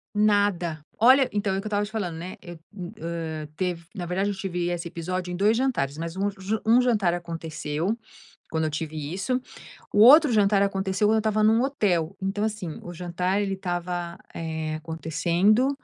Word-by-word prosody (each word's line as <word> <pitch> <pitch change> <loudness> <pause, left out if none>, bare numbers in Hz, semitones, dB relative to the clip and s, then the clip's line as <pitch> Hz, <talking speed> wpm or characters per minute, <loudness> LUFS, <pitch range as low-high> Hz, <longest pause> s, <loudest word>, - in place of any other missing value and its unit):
Nada. 200 -7 +2
Olha, 260 +3 +6
então 200 -2 0
é - - -1
o - - -1
que - - -16
eu - - -2
estava 205 0 +1
te 205 - -11
falando, 180 -7 -3
né. 180 +3 -6
Eu, 175 -1 -9 0.2
e 180 -3 -6
eh, 160 -2 -4
tev 180 -2 -1
na 175 -2 -4
verdade, 190 +3 0
eu 200 - -2
tive 180 -2 -2
esse 175 -1 -3
episódio 180 +2 -4
em - - -3
dois 210 +4 +3
jantares. 195 - 0
Mas 165 +2 -5
um 200 +1 0
ju 200 +2 -3
um 235 +3 +6
jantar 210 -8 +2
aconteceu, 165 +2 -3 0.5
quando 160 -1 0
eu - - 0
tive 155 +1 -4 0.2
isso. 250 +7 -1 0.5
O 205 - +2
outro 285 +5 +8
jantar 200 -2 +4
aconteceu 195 +1 +1
quando 220 - +4
eu - - +3
estava 215 0 +1
num 220 +2 +5
hotel. 195 - 0
Então 195 +2 -1
assim 210 -7 -3
o 175 - -7
jantar 180 +3 -1
ele 195 -1 -1
estava, 175 -2 -3 0.2
eh, 160 -1 -3
acontecendo 170 - +1
185 Hz, 195 wpm, -25 LUFS, 170-210 Hz, 0.5 s, outro